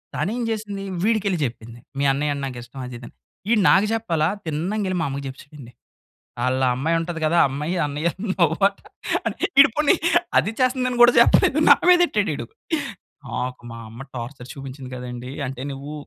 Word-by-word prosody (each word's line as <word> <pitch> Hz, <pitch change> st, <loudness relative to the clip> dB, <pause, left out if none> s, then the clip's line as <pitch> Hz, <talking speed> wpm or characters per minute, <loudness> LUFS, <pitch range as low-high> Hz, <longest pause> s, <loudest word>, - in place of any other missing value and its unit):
తను 155 Hz, +8 st, -1 dB
ఏం 240 Hz, -, -2 dB
చేసింది, 205 Hz, -3 st, -4 dB, 0.2 s
వీడికెళ్ళి 205 Hz, -5 st, +1 dB
చెప్పింది. 115 Hz, 0 st, -8 dB, 0.2 s
మీ -, -, +1 dB
అన్నయ్య 145 Hz, +1 st, 0 dB
అంటే 140 Hz, -1 st, -5 dB
నాకు 125 Hz, -2 st, -7 dB
ఇష్టం 135 Hz, +3 st, -12 dB
అది, 125 Hz, -, -8 dB
ఇది 120 Hz, -, -11 dB
అని. -, -, -15 dB, 0.4 s
ఈడు 220 Hz, -3 st, +4 dB
నాకు 195 Hz, +2 st, +5 dB
చెప్పాలా? 170 Hz, -9 st, 0 dB, 0.2 s
తిన్నంగెళ్ళి 185 Hz, +5 st, -2 dB
మా -, -, 0 dB
అమ్మకి 140 Hz, +1 st, -5 dB
చెప్పెసాడండి. 135 Hz, -1 st, -11 dB, 0.7 s
"ఆళ్ళ 130 Hz, +1 st, +1 dB
ఆ -, -, +2 dB
అమ్మాయి 160 Hz, +6 st, 0 dB
ఉంటది 165 Hz, -1 st, -4 dB
కదా! 170 Hz, +3 st, +2 dB
ఆ -, -, +4 dB
అమ్మాయి 150 Hz, +6 st, -3 dB
అన్నయ్య 150 Hz, +4 st, -1 dB, 0.3 s
లవ్ 165 Hz, -2 st, +3 dB
అంట." 200 Hz, -, -16 dB, 0.8 s
ఈడు 280 Hz, -, +9 dB
పోనీ 300 Hz, +4 st, +4 dB, 0.4 s
అది 205 Hz, -, +1 dB
చేస్తుందని 255 Hz, -1 st, +1 dB
కూడా 240 Hz, 0 st, +8 dB
చెప్పలేదు, -, -, +4 dB
నా -, -, +10 dB
మీదెట్టాడు 350 Hz, -, +4 dB
ఈడు. 120 Hz, -, -6 dB, 0.8 s
నాకు, 125 Hz, -1 st, -4 dB
మా 115 Hz, -, -8 dB
అమ్మ 115 Hz, +4 st, -10 dB
టార్చర్ 125 Hz, +1 st, -7 dB
చూపించింది 135 Hz, -1 st, -9 dB
కదండీ! 125 Hz, +1 st, -7 dB
అంటే 130 Hz, 0 st, -6 dB
నువ్వు 140 Hz, +2 st, -8 dB
150 Hz, 175 wpm, -22 LUFS, 130-200 Hz, 0.8 s, నా